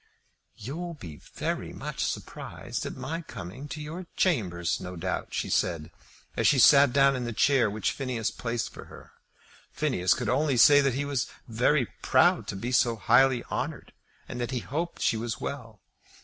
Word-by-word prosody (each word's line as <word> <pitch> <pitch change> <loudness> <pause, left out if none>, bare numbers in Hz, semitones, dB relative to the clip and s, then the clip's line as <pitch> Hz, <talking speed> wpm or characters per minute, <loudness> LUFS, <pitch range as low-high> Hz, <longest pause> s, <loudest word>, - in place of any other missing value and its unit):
"You'll 165 +10 -6
be 80 - -10 0.2
very - - -3
much - - -4
surprised - - -5
at - - -6
my 165 +2 -4
coming 125 - -8
to 150 - -7
your 165 +4 -7
chambers, 90 - 0
no 90 0 -7
doubt," 90 +2 -3
she - - -2
said, 85 -2 -1 0.4
as - - +2
she 145 - +4
sat 140 +2 +7
down 135 +1 +4
in 125 -1 -3
the 120 - -3
chair 130 -1 +3
which 105 +1 -1
Phineas 125 -5 -2
placed 120 -1 -3
for - - -10
her. - - -14 0.6
Phineas 120 - +1
could 125 - -4
only 135 +3 +1
say 145 +4 +7
that 135 -3 +1
he 145 +1 -1
was 140 -3 -1 0.2
very 125 +4 +2 0.2
proud - - +3
to - - -4
be 115 +6 -4
so 120 -2 +3
highly 130 +2 +3
honoured, - - -5 0.3
and 120 - -5
that 120 - -2
he 130 -3 -2
hoped 165 +8 -4
she 115 - +2
was 115 0 -4
well. 115 -8 -6
125 Hz, 175 wpm, -27 LUFS, 110-140 Hz, 0.6 s, sat